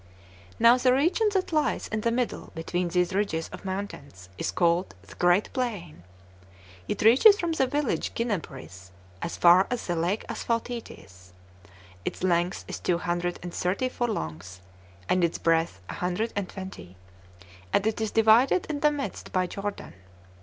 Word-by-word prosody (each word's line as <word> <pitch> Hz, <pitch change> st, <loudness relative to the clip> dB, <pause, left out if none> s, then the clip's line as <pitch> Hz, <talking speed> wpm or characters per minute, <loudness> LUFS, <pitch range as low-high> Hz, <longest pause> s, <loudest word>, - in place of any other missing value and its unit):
Now 235 Hz, +2 st, +6 dB
the 250 Hz, 0 st, +4 dB
region 345 Hz, -, +2 dB
that 375 Hz, -3 st, -1 dB
lies 305 Hz, -1 st, +1 dB
in 215 Hz, 0 st, -2 dB
the 230 Hz, -, +1 dB
middle 245 Hz, 0 st, -2 dB
between 175 Hz, +2 st, -2 dB
these 180 Hz, +1 st, 0 dB
ridges 185 Hz, -5 st, -1 dB
of -, -, -10 dB
mountains 165 Hz, -, -6 dB
is -, -, -3 dB
called 170 Hz, -, +1 dB
the 100 Hz, 0 st, -14 dB
Great 175 Hz, +3 st, +2 dB
Plain; 210 Hz, -, -4 dB, 0.9 s
it 205 Hz, -, -2 dB
reaches 275 Hz, -, +7 dB
from 340 Hz, -1 st, -1 dB
the 270 Hz, -5 st, +1 dB
village 290 Hz, -1 st, -1 dB
Ginnabris, 95 Hz, -, -4 dB, 0.3 s
as 170 Hz, -, -4 dB
far 180 Hz, +2 st, +6 dB
as 245 Hz, -1 st, -3 dB
the 175 Hz, -, -1 dB
lake 175 Hz, +6 st, -1 dB
Asphaltites; 225 Hz, -, -5 dB, 0.7 s
its -, -, -5 dB
length 175 Hz, 0 st, +1 dB
is -, -, -5 dB
two 175 Hz, -, +1 dB
hundred 175 Hz, 0 st, -2 dB
and 175 Hz, -1 st, -6 dB
thirty 195 Hz, +8 st, -1 dB
furlongs, 95 Hz, -, -4 dB, 0.5 s
and 185 Hz, -1 st, +2 dB
its 170 Hz, -, +1 dB
breadth 165 Hz, -4 st, +1 dB
a -, -, -6 dB
hundred 180 Hz, +6 st, -2 dB
and 200 Hz, -3 st, -2 dB
twenty, 95 Hz, -, -9 dB, 0.8 s
and 200 Hz, -, +2 dB
it 220 Hz, 0 st, 0 dB
is 220 Hz, -, 0 dB
divided 225 Hz, -, +4 dB
in 290 Hz, -, -3 dB
the 300 Hz, -, +4 dB
midst 280 Hz, -9 st, -5 dB
by 185 Hz, -1 st, +1 dB
Jordan. 200 Hz, -, -6 dB
190 Hz, 160 wpm, -27 LUFS, 170-235 Hz, 0.9 s, reaches